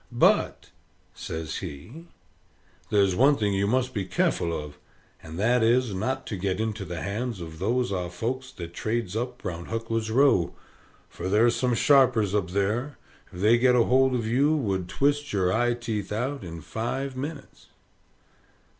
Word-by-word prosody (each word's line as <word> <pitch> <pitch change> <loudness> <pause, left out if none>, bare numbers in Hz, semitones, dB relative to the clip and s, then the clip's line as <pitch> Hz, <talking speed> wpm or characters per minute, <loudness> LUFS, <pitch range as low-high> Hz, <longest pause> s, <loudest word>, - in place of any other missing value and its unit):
But," - - +2 0.4
says 80 -1 -5
he, 100 - -8 0.8
"there's 100 -2 +3
one 140 +6 +5
thing 105 -2 0
you 100 +1 +1
must 130 +3 0
be 100 - -1
careful 85 -2 0
of; 75 -2 -6 0.4
and 80 0 -9
that 120 +5 +2
is, 120 0 +3
not 130 +7 -2
to 105 - -4
get 95 0 -2
into 110 -3 -2
the 85 -2 -5
hands 110 +2 -3
of 80 -2 -8
those 120 +5 0
are 90 -2 -2
folks 125 +8 -4
that 85 -1 -8
trades 110 -2 -2
up 125 +1 -4
round 85 -2 -5
Huckler's 115 0 -2
Row, 115 -7 +3 0.5
for 95 - -6
ther's 115 +4 +4
some 125 -2 +1
sharpers 115 -7 +4
up 100 -3 0
there, 105 +8 -1 0.3
if 90 - -8
they 115 +3 +5
get 125 0 +4
hold 130 +2 +4
of 115 -3 -1
you, 140 +7 +2
would 95 - -1
twist 145 +1 0
your 95 -2 +1
eye 120 +2 +2
teeth 110 -4 -4
out 125 +4 -2
in 85 -2 -7
five 130 - -3
minits." 140 +2 -7
110 Hz, 165 wpm, -26 LUFS, 95-125 Hz, 0.8 s, one